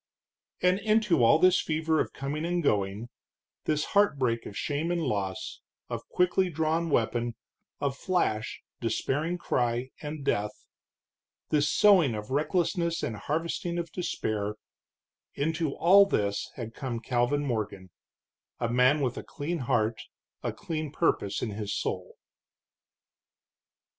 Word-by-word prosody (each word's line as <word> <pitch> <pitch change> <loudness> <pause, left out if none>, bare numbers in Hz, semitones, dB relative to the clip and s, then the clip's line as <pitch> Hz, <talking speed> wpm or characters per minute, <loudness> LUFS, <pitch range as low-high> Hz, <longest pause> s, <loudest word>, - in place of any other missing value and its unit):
And 180 +1 +4
into 215 - +3
all 115 +7 +7
this 185 +2 +5
fever 160 0 0
of - - 0
coming 140 +3 -4
and 175 0 0
going, 105 -1 0 0.6
this 150 -1 +1
heartbreak 135 - +2
of 100 - -8
shame 150 +3 -1
and 175 0 0
loss, 100 -5 -2 0.3
of - - -5
quickly 180 +1 +2
drawn 160 +1 0
weapon, 120 -2 0 0.4
of 140 -1 -1
flash, 120 - -1 0.2
despairing 145 +9 -1
cry, 120 -5 -1
and 150 -1 -6
death 105 -2 -1 0.8
this 150 -1 +2
sowing 180 - +5
of 105 +3 -6
recklessness 170 +3 0
and 110 - -2
harvesting 165 +7 -2
of 170 -1 -3
despair 105 - -2 0.8
into 160 0 -1
all 195 +3 +7
this 100 - 0
had 115 -3 -6
come 125 -3 -4
Calvin 125 +4 0
Morgan, 105 -7 -3 0.7
a 120 - 0
man 125 +5 +4
with 125 -3 -1
a - - -7
clean 165 +4 -4
heart, 110 -3 0 0.4
a - - -1
clean 155 -3 -4
purpose 100 - 0
in 110 - -2
his 105 0 -3
soul. - - -3
145 Hz, 130 wpm, -28 LUFS, 115-170 Hz, 0.8 s, all